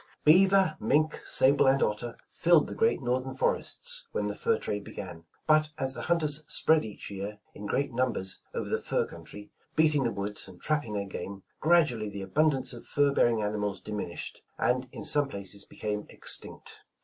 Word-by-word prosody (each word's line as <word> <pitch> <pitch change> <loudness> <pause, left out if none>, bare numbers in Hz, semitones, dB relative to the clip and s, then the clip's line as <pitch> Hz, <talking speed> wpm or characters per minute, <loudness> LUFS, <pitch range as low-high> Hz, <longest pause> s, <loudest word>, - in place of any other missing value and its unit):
Beaver, 190 +1 +5
mink, 150 +7 +1
sable 135 +1 +4
and 135 +1 +4
otter 110 +3 -2
filled 170 -2 +4
the - - -6
great 225 -11 +1
North 125 +2 0
ern 130 - -6
forests - - -1
when 470 - -1
the - - -3
fur 460 -1 +1
trade 105 0 -3
began, 85 -5 -8 0.2
but 155 0 +4
as 135 -2 0
the - - -4
hunt 170 -1 +1
ers 150 0 +2
spread 160 -1 +3
each 105 -2 -8
year 100 +2 -5 0.2
in 105 - -7
great 135 +4 -1
numbers 115 -6 -1
over - - -4
the - - -1
fur - - 0
country, 105 0 -11 0.2
beating 155 -3 +4
the 115 - 0
woods, 100 0 -3
and 90 -2 -13
trapping 150 -8 -1
their 100 -1 -2
game, 95 0 -7 0.2
gradually 145 -11 +3
the 100 -1 -6
abundance 135 +5 +1
of 120 - -10
fur 145 -1 +3
bearing 115 -5 +3
animals 105 -1 -2
dimin 105 -4 -5
ished, - - -6 0.2
and 125 +1 0
in - - -8
some 145 -1 +4
places 100 -2 -7
became 105 -1 -4
extinct. - - -3
130 Hz, 185 wpm, -29 LUFS, 105-155 Hz, 0.2 s, Beaver